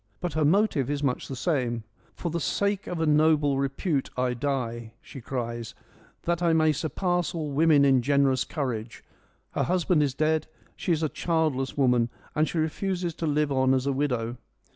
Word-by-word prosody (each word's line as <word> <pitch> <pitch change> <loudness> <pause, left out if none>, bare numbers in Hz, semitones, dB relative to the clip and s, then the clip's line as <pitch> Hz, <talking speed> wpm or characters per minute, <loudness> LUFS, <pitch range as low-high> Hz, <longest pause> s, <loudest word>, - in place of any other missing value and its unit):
But 175 - -3
her 155 - +1
motive 155 - +2
is 145 0 -2
much 130 -3 -1
the 135 - -5
same: 125 -4 -1 0.2
' - - -34
for 170 - -4
the 170 - -1
sake 200 +5 -1
of 175 - -3
a 165 - +1
noble 150 -2 +3
repute 140 +2 -1
I 125 0 +1
die,' 120 -3 -3
she 135 - -11
cries 120 -2 -4
1 - - -30 0.4
that 170 0 0
I 170 -2 +3
may 155 -1 +4
surpass 175 +4 -1
all 155 -3 -3
women 150 0 +4
in 135 -2 +4
generous 135 -1 +2
courage.' 125 -7 -4 0.5
Her - - -1
husband 180 -2 +2
is, 140 -3 0
dead, 155 +1 +1 0.3
she 180 - -2
is 160 -1 +1
a 155 - +1
childless 155 -7 -1
woman, 125 -3 +3 0.2
and 155 +1 +1
she - - -4
refuses 175 +2 -1
to 165 - -3
live 150 0 +1
on 130 0 +3
as 130 0 -1
a 140 - +1
widow. 125 -4 -1
145 Hz, 190 wpm, -27 LUFS, 130-160 Hz, 0.5 s, may